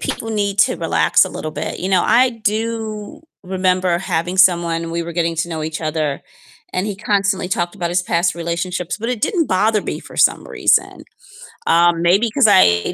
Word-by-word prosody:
people 225 - -4
need 200 -2 -2
to - - +2
relax - - +2
a - - -5
little 155 - -6
bit. - - -5
You 185 - -2
know, 185 -2 +3
I 255 +1 +4
do 220 +3 -4 0.2
remember 185 -1 0
having 175 0 -2
someone 170 -3 +2
we 170 0 -2
were 170 0 -7
getting 165 0 -1
to 165 +2 -2
know 160 -2 -4
each 155 +1 -4
other, 155 -3 -2 0.5
and 185 +2 -2
he 205 - -3
constantly 200 -2 0
talked 175 -1 -2
about 175 -4 -3
his 175 +1 +1
past 170 0 0
relationships, 170 +1 -3
but 230 +2 -4
it 245 -3 -3
didn't 350 -8 +1
bother 210 +2 +1
me - - -4
for - - -14
some - - +2
reason. - - 0 0.6
Um, 170 0 +3
maybe 195 +7 +3
'cause 265 -1 +4
I 175 - +4
185 Hz, 190 wpm, -18 LUFS, 170-210 Hz, 0.6 s, I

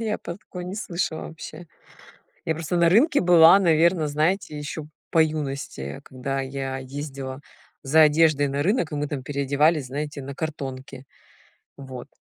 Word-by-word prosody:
я 220 -2 -2
про 170 - -7
такое 180 -3 -9
не 185 +2 -6
слышала 170 -6 -3
вообще. 160 +1 -10 0.8
Я 160 - 0
просто 165 +1 -3
на 170 -1 +4
рынке 285 - +4
была, 175 +1 +7
наверное, 165 -2 +3
знаете, 155 +2 0
ещё 150 +1 -6 0.2
по 165 - +3
юности, 140 - -4
когда 135 +1 -4
я 135 0 -4
ездила 135 0 -6 0.4
за 155 +4 +4
одеждой 150 -1 +4
на 140 +1 -1
рынок, 185 - +1
и 150 - -3
мы 145 0 -2
там 140 -3 -4
переодевались, 140 +1 +1
знаете, 145 +1 -5
на 140 +1 -7
картонке. 135 -3 -6 0.7
Вот. 130 0 -9
150 Hz, 150 wpm, -24 LUFS, 135-165 Hz, 0.8 s, была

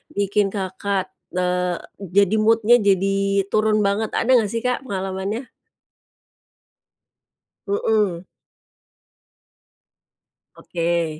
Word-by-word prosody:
bikin 200 0 +1
Kakak, 190 0 -2 0.2
eee, 180 -1 0 0.2
jadi 200 +2 +2
mood-nya 225 +2 +4
jadi 195 0 +1
turun 215 0 +2
banget? 200 +2 0
Ada 245 - 0
enggak 215 - 0
sih 230 - -2
Kak 250 +1 -1
pengalamannya? 195 +4 -4 2.2
Mhm. 200 -3 0 2.3
Oke. 170 -2 -2
200 Hz, 80 wpm, -21 LUFS, 185-215 Hz, 2.3 s, mood-nya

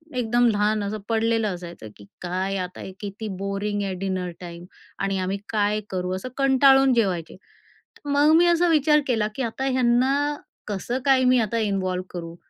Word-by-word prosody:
एकदम 240 0 +2
लहान 210 0 +1
असं 205 +2 -3
पडलेलं 225 0 +1
असायचं 175 -9 -10
की 100 - -14 0.2
"काय 185 +2 -2
आता 180 -1 -5
हे - - -7
किती 205 +2 -6
बोरिंग 200 +1 -2
आहे 195 -1 -3
डिनर 185 -2 -3
टाईम 170 -1 -9 0.3
आणि 195 0 -1
आम्ही 185 +2 -2
काय 210 -1 +1
करू." 185 -1 -2
असं 190 +7 -6
कंटाळून 270 -1 +5
जेवायचे. 185 -9 -1 0.7
मग 290 +1 +3
मी 340 +2 +5
असा 345 0 +3
विचार 300 -1 +4
केला 225 -4 +1
की - - -4
आता 240 +3 -3
ह्यांना 255 +1 +2 0.5
कसं 215 +5 -3
काय 265 -2 +4
मी 250 0 +4
आता 225 0 -1
इन्वॉल्व 190 -4 -1
करू 170 -1 -7
210 Hz, 170 wpm, -24 LUFS, 190-255 Hz, 0.7 s, कंटाळून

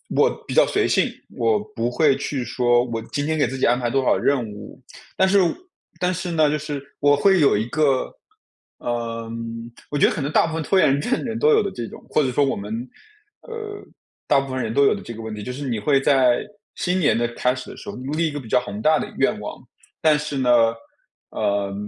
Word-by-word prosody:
我 - - +5 0.2
比 - - -5
较 - - +6
随 - - +1
性， - - +2 0.2
我 115 -2 +2
不 115 0 -1
会 140 +2 +3
去 130 -4 -3
说： 120 0 +2
“我 115 -2 -4
今 145 - -1
天 160 +1 0
给 145 - +2
自 135 +3 -5
己 - - +1
安 120 +1 +3
排 120 -1 -1
多 135 +2 0
少 - - +4
任 130 -5 +1
务。” 105 +4 -11 0.4
但 190 - +4
是 200 +1 +4 0.6
但 180 0 +1
是 180 0 -4
呢， 155 -3 +3
就 150 - 0
是 145 -2 -7
我 145 0 +4
会 190 +6 +4
有 140 -8 +4
一 110 - -1
个， 140 -2 +1 0.6
呃， 115 -1 -4 0.6
我 145 - -2
觉 - - +5
得 - - 0
可 - - -3
能 140 +2 -2
大 - - +4
部 165 - -4
分 165 - -2
拖 190 +6 +1
延 145 -4 +3
症 245 - -4
的 - - -1
人 225 -3 -3
都 455 - +4
有 440 -1 +5
的 - - -3
这 120 -2 -5
种， - - -12
或 - - +3
者 135 - 0
说 140 +3 +2
我 135 - 0
们， 110 +5 -5 0.5
呃， 435 -3 -7 0.5
大 140 - +4
部 135 -1 -5
分 130 - -1
人 110 -2 -2
都 140 +5 +3
有 - - +4
的 - - -6
这 115 - -8
个 115 - -8
问 110 -1 -5
题， 105 - -6
就 125 - -5
是 140 +2 -5
你 115 -4 -1
会 135 +6 +3
在 130 -3 +3 0.3
新 180 +1 0
年 150 -9 +3
的 120 0 +1
开 125 +2 0
始 130 - -8
的 - - -12
时 - - -9
候， - - -6
立 150 +6 -1
一 - - -3
个 145 - -5
比 125 - -11
较 125 - +4
宏 100 -1 -7
大 155 +5 +4
的 - - -5
愿 - - +1
望。 - - -7 0.4
但 155 -2 +4
是 150 -1 -4
呢， 130 -2 +1 0.8
呃， 100 -1 -1
135 Hz, 265 characters per minute, -22 LUFS, 120-155 Hz, 0.8 s, 较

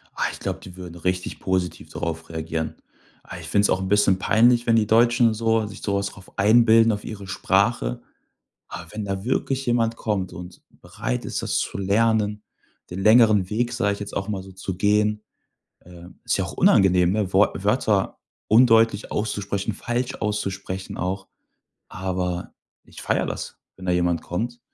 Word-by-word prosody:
Ach, - - -1
ich - - -10
glaube, - - -4
die 90 - -12
würden 90 -2 -9
richtig 90 +2 -3
positiv 90 -4 -2
darauf 80 0 -5
reagieren. 80 0 -4 0.5
Ah, - - -9
ich 85 - -9
find's 100 +5 +2
auch 95 - +1
'n 95 - -3
bisschen 100 -2 +3
peinlich, 120 +4 +3
wenn 115 - +4
die 110 -2 +3
Deutschen 120 +1 +4
so 110 0 +1
sich 105 0 -10
so 100 - -1
was 100 0 0
drauf 95 -1 -14
einbilden 115 +2 +5
auf 105 -1 -4
ihre 100 -3 -8
Sprache. - - 0 0.7
Aber 90 -1 -8
wenn 105 -1 -4
da 95 0 -4
wirklich 135 +1 -1
jemand 115 -1 +1
kommt 100 -5 -2
und 90 0 -10 0.2
bereit - - -4
ist, - - -3
das - - 0
zu - - -3
lernen, 105 +1 +1 0.5
den 90 +2 -5
längeren 110 -3 +5
Weg, 120 +4 -1
sage 110 -5 0
ich 100 - -11
jetzt 100 - -6
auch 100 +1 -2
mal 100 -3 -3
so, 95 0 -13
zu 95 0 -6
gehen, 105 +2 +1 0.6
ähm, 90 0 -14
ist - - 0
ja - - -1
auch - - -7
unangenehm, 90 -2 +4
ne? 100 -2 -1
Wort 95 0 +2
Wörter 105 -2 +1 0.3
undeutlich 115 -2 +4
auszusprechen, 100 0 -2
falsch 120 +4 -3
auszusprechen 100 -3 -4
auch. 95 +1 -3 0.6
Aber 90 -2 -3 0.3
ich - - -13
feiere - - 0
das, - - -6 0.2
wenn 95 - -11
da 90 - +1
jemand 85 -1 +1
kommt. 120 +7 -4
100 Hz, 175 wpm, -23 LUFS, 90-110 Hz, 0.7 s, einbilden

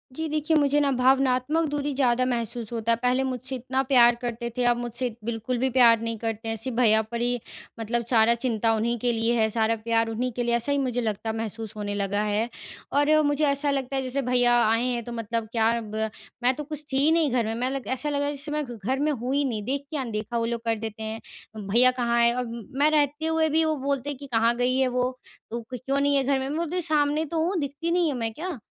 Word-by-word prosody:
जी, 320 0 -3
देखिए 310 +1 0
मुझे 290 0 +3
ना 285 -1 +2
भावनात्मक 265 +4 +2
दूरी 290 -1 -2
ज़्यादा 255 -2 +2
महसूस 235 -2 -3
होता 230 0 -1
है - - +4
पहले 250 +1 +2
मुझसे 260 0 -4
इतना 260 +1 -1
प्यार 240 -3 +6
करते 235 0 -3
थे 250 - +1
अब 240 0 +3
मुझसे 240 +1 -3
बिल्कुल 235 +2 -2
भी 260 +2 +1
प्यार 235 -3 +5
नहीं 230 0 -3
करते 225 0 -4
हैं। 225 - -1
सिर्फ 230 +3 -5
भैया 220 -3 +5
पर 235 0 -3
ही 245 0 0 0.4
मतलब 235 +1 -1
सारा 230 -1 +5
चिंता 230 -2 0
उन्हीं 235 +2 0
के 245 +1 +1
लिए 230 0 +1
है, 220 - +4
सारा 225 +1 +1
प्यार 225 0 0
उन्हीं 245 +3 -2
के 245 +1 -2
लिए 235 0 +1
ऐसा 235 +4 -1
ही 285 - +2
मुझे 250 -3 0
लगता 220 -1 -2
है 220 - -2
महसूस 225 -1 -5
होने 205 -1 -3
लगा 205 0 -1
है। 215 +3 0 0.4
और 290 +1 +3 0.2
मुझे 290 +1 +2
ऐसा 280 +1 +1
लगता 270 -1 -2
है 270 - 0
जैसे 260 +2 -2
भैया 245 -1 +2
आएँ 230 +3 +2
हैं 235 - -3
तो 240 - -8
मतलब 230 -1 -3
क्या 225 -1 +2
अब 215 -2 -7 0.5
मैं 250 - +4
तो 300 - -5
कुछ 300 0 -7
थी - - +2
ही 315 - +4
नहीं 320 -5 +2
घर 240 -2 +1
में। 220 - -2
मैं 250 +2 -1
लग 270 -1 -4
ऐसा 295 +3 -3
लगा 285 0 0
जैसे 285 +1 -6
मैं 300 0 -1
घ 240 -2 -8
घर 265 +2 0
में 300 +1 +1
हूँ 255 0 -3
ही 285 - +2
नहीं 225 -5 -2
देख 275 +5 -2
के 310 - -2
अनदेखा 230 -3 -3
वो 230 - 0
लोग 235 0 -2
कर 230 0 +1
देते 220 0 -6
हैं। 220 +1 -5 0.5
भैया 245 +5 +5
कहाँ 235 0 +2
है? 235 0 +5
अब 235 -3 -5
मैं 295 - +5
रहते 295 0 +1
हुए 320 -1 +2
भी 320 +2 +3
वो 315 0 +1
बोलते 280 0 -2
हैं 285 - -5
कि 280 - -9
कहाँ 230 +1 +3
गई 250 +1 +1
है 265 -1 +3
वो, 250 +1 -1 0.3
तो 235 +1 -3
क्य 250 +3 -8
क्यों 270 +3 -1
नहीं 285 0 +2
है 275 - +3
घर 275 0 +1
में? 265 +1 -3
मैं 300 - -2
बोलती 340 +1 -2
है 365 - 0
सामने 305 -1 +1
तो 320 +1 -1
हूँ 370 +2 -1
दिखती 295 +3 -3
नहीं 345 -3 +2
हूँ 255 - -4
मैं 225 -1 -1
क्या? 335 +1 -5
250 Hz, 260 wpm, -25 LUFS, 230-280 Hz, 0.5 s, प्यार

